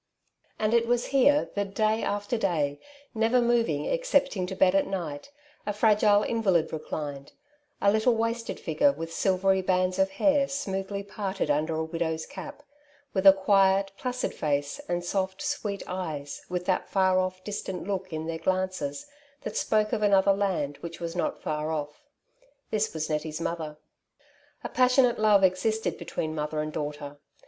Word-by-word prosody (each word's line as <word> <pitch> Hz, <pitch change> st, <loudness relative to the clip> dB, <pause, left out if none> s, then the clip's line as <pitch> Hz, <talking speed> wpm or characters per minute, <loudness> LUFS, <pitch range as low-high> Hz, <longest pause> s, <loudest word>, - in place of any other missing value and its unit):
And 215 Hz, +1 st, 0 dB
it 235 Hz, 0 st, +3 dB
was 240 Hz, 0 st, +1 dB
here 285 Hz, +2 st, +4 dB
that 200 Hz, -1 st, -3 dB
day 215 Hz, +1 st, +2 dB
after 205 Hz, +3 st, -1 dB
day, 155 Hz, -9 st, 0 dB, 0.3 s
never 225 Hz, +2 st, +2 dB
moving 235 Hz, -11 st, +1 dB
excepting 280 Hz, -, +1 dB
to 190 Hz, -, -5 dB
bed 185 Hz, -1 st, +4 dB
at 195 Hz, -, +2 dB
night, 175 Hz, -, -5 dB, 0.4 s
a 210 Hz, -, 0 dB
fragile 210 Hz, -1 st, +4 dB
invalid 190 Hz, -10 st, +1 dB
reclined 145 Hz, -3 st, -5 dB, 0.2 s
— 290 Hz, 0 st, -44 dB
a 200 Hz, -, +6 dB
little 220 Hz, +3 st, +3 dB
wasted 230 Hz, +1 st, -2 dB
figure 165 Hz, -, +2 dB
with 165 Hz, -9 st, -7 dB
silvery 190 Hz, 0 st, +2 dB
bands 185 Hz, 0 st, +1 dB
of 190 Hz, 0 st, +3 dB
hair 285 Hz, +4 st, +3 dB
smoothly 200 Hz, -7 st, -3 dB
parted 195 Hz, -5 st, -2 dB
under 155 Hz, +2 st, 0 dB
a 160 Hz, -, -1 dB
widow's 160 Hz, 0 st, -2 dB
cap, 290 Hz, 0 st, -9 dB, 0.5 s
with 190 Hz, 0 st, +3 dB
a -, -, +13 dB
quiet, 195 Hz, 0 st, +3 dB
placid 250 Hz, +3 st, -3 dB
face 145 Hz, -1 st, -1 dB
and 175 Hz, 0 st, -1 dB
soft 190 Hz, +1 st, -1 dB
sweet 200 Hz, -2 st, -3 dB
eyes, 155 Hz, -6 st, -5 dB
with 180 Hz, 0 st, -3 dB
that 185 Hz, -1 st, 0 dB
far 185 Hz, -1 st, +3 dB
off, 185 Hz, 0 st, -2 dB
distant 190 Hz, -3 st, -5 dB
look 190 Hz, -2 st, -3 dB
in 160 Hz, 0 st, -4 dB
their 165 Hz, 0 st, -4 dB
glances 185 Hz, -7 st, -2 dB, 0.4 s
that -, -, -6 dB
spoke 215 Hz, -1 st, +1 dB
of -, -, 0 dB
another 200 Hz, -1 st, +4 dB
land 170 Hz, -8 st, -1 dB
which 170 Hz, -1 st, -8 dB
was 170 Hz, 0 st, -5 dB
not 175 Hz, -, -2 dB
far 150 Hz, 0 st, -2 dB
off. 150 Hz, -1 st, -4 dB, 0.7 s
This 215 Hz, 0 st, 0 dB
was 155 Hz, -1 st, -3 dB
Nettie's 155 Hz, 0 st, -3 dB
mother. 160 Hz, -3 st, -4 dB, 0.9 s
A -, -, -4 dB
passionate 250 Hz, -1 st, +3 dB
love 210 Hz, -2 st, +5 dB
existed 205 Hz, +4 st, +1 dB
between 155 Hz, -1 st, -3 dB
mother 150 Hz, 0 st, -3 dB
and 155 Hz, 0 st, -3 dB
daughter. 145 Hz, -1 st, -5 dB
190 Hz, 165 wpm, -27 LUFS, 160-215 Hz, 0.9 s, a